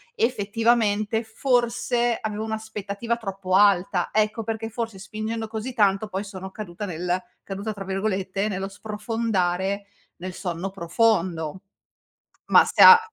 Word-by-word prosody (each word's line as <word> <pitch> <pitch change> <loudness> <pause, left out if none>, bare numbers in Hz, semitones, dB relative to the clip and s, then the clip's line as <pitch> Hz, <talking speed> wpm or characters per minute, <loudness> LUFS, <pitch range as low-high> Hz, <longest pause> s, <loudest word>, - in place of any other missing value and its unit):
effettivamente 225 -1 +1
forse 240 0 +1
avevo 215 0 -3
un'aspettativa 220 0 -3
troppo 195 -4 -4
alta, 190 -2 +4
ecco 215 +1 +1
perché 225 +1 -3
forse 225 -3 -4
spingendo 215 +3 -4
così 220 +3 -5
tanto, 205 -2 +2
poi 195 -1 -3
sono 190 -2 -8
caduta 205 -1 -6
nel 180 0 -2 0.2
"caduta" 200 +2 -4
tra 200 -1 -7
virgolette 195 0 -1
nello 195 -1 -3
sprofondare 200 -3 -1 0.3
nel 185 +1 -6
sonno 180 +1 -4
profondo. 180 -3 0 0.9
Ma - - +7
se - - +5
ha 465 -1 +12
205 Hz, 125 wpm, -24 LUFS, 190-225 Hz, 0.9 s, ha